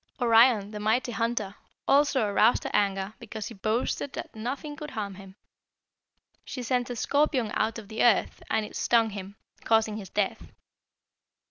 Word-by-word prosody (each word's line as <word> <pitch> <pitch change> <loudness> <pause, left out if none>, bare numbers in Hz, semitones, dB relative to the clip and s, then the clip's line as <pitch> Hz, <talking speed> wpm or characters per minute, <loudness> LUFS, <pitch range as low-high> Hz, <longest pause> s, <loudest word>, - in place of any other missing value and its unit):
Orion, 230 -3 +5
the 210 - -6
mighty 225 +4 +1
hunter, 230 -3 -1 0.3
also 275 -4 +4
aroused 210 +3 +3
her - - -4
anger 195 0 +1
because 220 -2 -7
he - - -9
boasted 225 +6 -2
that - - -7
nothing 270 +7 -4
could 300 0 -7
harm 205 -6 -4
him. 190 0 -12 1.1
She 250 - -6
sent 245 +1 0
a 245 - -4
scorpion 270 -3 +1
out 220 +1 0
of 220 -3 -9
the 220 +1 -1
earth, 235 -4 +3
and 220 -1 +1
it - - -11
stung 230 -2 +2
him, 200 0 -8 0.3
causing 220 -1 +2
his 195 -4 -8
death. 205 0 -2
220 Hz, 160 wpm, -27 LUFS, 210-245 Hz, 1.1 s, Orion